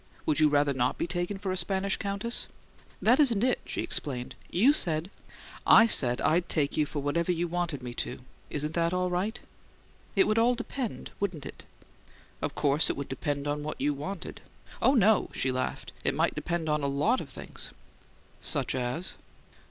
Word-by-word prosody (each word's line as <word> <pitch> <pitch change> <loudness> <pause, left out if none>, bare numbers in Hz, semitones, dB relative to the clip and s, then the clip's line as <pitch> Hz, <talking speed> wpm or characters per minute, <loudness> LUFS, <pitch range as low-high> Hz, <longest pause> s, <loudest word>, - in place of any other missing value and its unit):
"Would 155 0 +2
you 155 -1 +6
rather 145 -1 +3
not 125 -1 0
be - - -1
taken 175 +3 -2
for 195 -1 -3
a - - -1
Spanish 195 +1 0
countess?" 200 +4 -2 0.6
"That 245 +6 +5
isn't 240 -8 +4
it," 255 0 +2
she - - -3
explained. 125 -4 -4 0.2
"You 235 +12 +5
said 170 - -1 0.3
" - - -15
"I 225 - +9
said 125 - +4
I'd 170 +2 +2
take 145 -3 0
you 150 -1 +2
for 145 -1 -4
whatever 170 +5 +1
you 175 0 0
wanted 170 -6 -2
me 120 -1 -5
to. - - -5 0.3
Isn't 150 +1 -2
that 170 +1 +1
all 180 0 0
right?" 195 +6 -1 0.8
"It 385 - +5
would 220 -5 +2
all 240 +2 +4
depend, 240 0 -5
wouldn't 180 -8 -2
it?" - - -9 0.8
"Of - - -2
course 150 +1 +3
it - - -1
would 140 - -5
depend 140 +2 -2
on 145 0 -1
what 150 +1 -5
you 145 +2 +1
wanted." 175 +6 -6 0.4
"Oh, 270 - +5
no!" 220 -3 +4
she 130 - +1
laughed. 130 0 -3
"It - - +1
might - - +2
depend 170 -2 -2
on 150 -1 +1
a 140 - 0
lot 150 - +1
of - - -9
things." - - -7 0.7
"Such 140 -4 0
as?" 130 +8 -2
170 Hz, 190 wpm, -29 LUFS, 145-200 Hz, 0.8 s, I